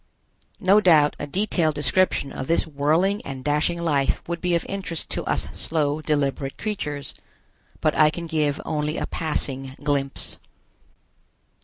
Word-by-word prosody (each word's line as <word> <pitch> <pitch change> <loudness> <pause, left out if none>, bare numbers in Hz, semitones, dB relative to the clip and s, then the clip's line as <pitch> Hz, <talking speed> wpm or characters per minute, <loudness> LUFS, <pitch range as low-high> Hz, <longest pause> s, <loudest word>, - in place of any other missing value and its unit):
No 200 +1 +5
doubt 155 -6 +5
a 145 - -4
detailed 170 -2 +1
description 150 0 +1
of 130 - -5
this 165 - +3
whirling 160 +7 +1
and 135 -2 -7
dashing 150 +4 +1
life 145 -5 0
would 170 0 -3
be 180 -1 +1
of 170 - -1
interest 190 -5 -4
to - - -2
us - - 0
slow, 155 -1 -1
deliberate 140 -2 -1
creatures. 150 -10 -4 0.7
But - - +2
I 155 - +6
can 170 +2 -5
give 155 -3 0
only 150 +1 -1
a - - -1
passing 135 -4 -2
glimpse. 140 -2 -1
155 Hz, 145 wpm, -24 LUFS, 145-170 Hz, 0.7 s, I